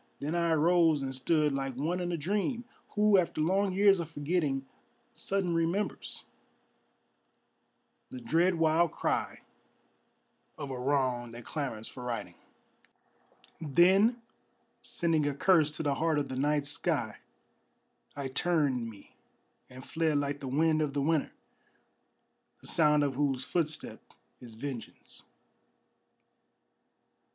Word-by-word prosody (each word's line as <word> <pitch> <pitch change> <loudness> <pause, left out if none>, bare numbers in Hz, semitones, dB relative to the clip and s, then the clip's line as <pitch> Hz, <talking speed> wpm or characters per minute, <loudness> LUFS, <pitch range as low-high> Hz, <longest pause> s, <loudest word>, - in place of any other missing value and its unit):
Then 150 +3 -3
I 170 -1 +1
arose, 165 -2 +3
and 135 0 -3
stood 150 +2 +1
like 135 -1 -3
one 160 +7 -1
in 175 -1 -2
a 170 - -1
dream 205 - -2 0.3
Who, 210 -2 +5
after 170 -3 -2
long 190 +5 +2
years 195 0 +4
of 165 -2 -4
forgetting, 145 -3 -1 0.5
sudden 190 -3 -1
remembers 170 +5 -2 1.9
The 260 - -8
dread 185 -6 +2
wild 165 0 +3
cry - - -2 1.2
of 145 -3 -6
a 130 - -5
wrong 130 -3 0
that 115 +1 -11
clamors 125 -8 -4
for 125 - -9
righting; 115 -7 -4 1.3
Then 190 - +3 0.6
sending 160 -3 0
a 145 - -2
curse 155 -1 +3
to - - -3
the 145 -2 +1
heart 160 +1 0
of 145 -1 -1
the 130 - -4
night 145 +2 +1
sky, 145 +1 -1 1.0
I 140 -1 -4
turned 135 -5 0
me 105 -3 -15 0.6
And 130 0 -11
fled 160 -2 0
like 145 0 -2
the 135 - -6
wind 155 +4 +2
of 145 -2 -2
the 140 - +1
winter, 155 -1 +1 1.3
the - - -18
sound 150 -2 +4
of 140 -2 0
whose 135 -1 0
footstep 155 0 -1 0.4
is 120 -3 -12
vengeance. 130 -1 -8
150 Hz, 125 wpm, -30 LUFS, 135-170 Hz, 1.9 s, Who